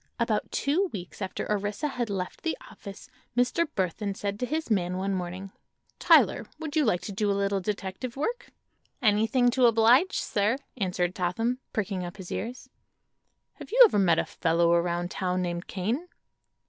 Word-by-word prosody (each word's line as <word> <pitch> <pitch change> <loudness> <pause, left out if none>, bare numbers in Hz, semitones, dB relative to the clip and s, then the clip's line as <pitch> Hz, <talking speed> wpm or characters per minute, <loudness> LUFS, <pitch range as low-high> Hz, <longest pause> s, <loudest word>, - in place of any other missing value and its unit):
About - - 0
two 335 +8 +1
weeks 180 0 -8
after 190 - -3
Orissa 205 +7 -1
had 245 -4 -3
left 190 -2 -4
the 325 - -2
office 200 -1 -10 0.3
Mr. 250 +7 +2
Burthon 195 +2 -1
said 200 0 -4
to 250 - -1
his 310 -3 -3
man 180 -3 +1
one 195 +1 -1
morning: 185 +1 -4 0.5
"Tyler, - - +4
would 320 -1 -6
you 310 - +4
like 180 -6 +1
to - - -6
do 205 +1 0
a 200 - +1
little 200 0 +1
detective 205 +5 -4
work?" 480 - -3 0.5
"Anything 225 +1 +3
to 255 0 +4
oblige, 235 - +4
sir," 210 +5 0 0.2
answered 180 -5 -1
Totham, 225 +8 -1
pricking 200 -3 -2
up 175 +3 -7
his 190 -3 -9
ears. 240 +5 -5 0.9
"Have - - -10
you - - 0
ever 390 - +2
met 170 -4 +4
a - - +1
fellow 170 +1 +1
around 175 +1 0
town 185 -1 -1
named 175 0 -4
Kane?" 225 - -2
205 Hz, 170 wpm, -27 LUFS, 185-245 Hz, 0.9 s, Tyler